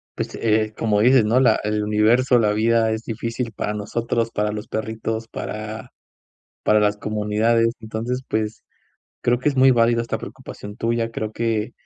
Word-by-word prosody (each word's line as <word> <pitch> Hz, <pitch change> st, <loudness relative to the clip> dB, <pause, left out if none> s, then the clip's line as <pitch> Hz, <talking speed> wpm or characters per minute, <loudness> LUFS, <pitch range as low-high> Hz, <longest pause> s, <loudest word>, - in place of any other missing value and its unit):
pues, -, -, -4 dB
eh, 110 Hz, -1 st, +1 dB
como 105 Hz, -2 st, +1 dB
dices, 125 Hz, 0 st, +5 dB
¿no?, 115 Hz, +4 st, +3 dB
la 115 Hz, -4 st, +4 dB
el 105 Hz, 0 st, 0 dB
universo, 115 Hz, +5 st, +3 dB
la 105 Hz, -2 st, +2 dB
vida 110 Hz, +1 st, +2 dB
es 110 Hz, +1 st, -3 dB
difícil 115 Hz, +1 st, -4 dB
para 105 Hz, +1 st, -3 dB
nosotros, 115 Hz, +2 st, -2 dB
para 105 Hz, 0 st, -1 dB
los 105 Hz, 0 st, -6 dB
perritos, 110 Hz, +1 st, -3 dB
para 110 Hz, 0 st, -6 dB, 0.7 s
para 105 Hz, -, +4 dB
las 105 Hz, 0 st, +2 dB
comunidades. 110 Hz, +3 st, +1 dB
Entonces, 115 Hz, +4 st, -4 dB
pues, 110 Hz, 0 st, -2 dB, 0.6 s
creo 120 Hz, 0 st, +2 dB
que 150 Hz, -, +1 dB
es 140 Hz, -, -1 dB
muy 130 Hz, +1 st, +6 dB
válida 115 Hz, -1 st, +3 dB
esta 115 Hz, -, -3 dB
preocupación 105 Hz, 0 st, -9 dB
tuya. 115 Hz, 0 st, -1 dB
Creo 110 Hz, -1 st, -4 dB
que 110 Hz, -1 st, -1 dB
110 Hz, 165 wpm, -22 LUFS, 105-115 Hz, 0.7 s, muy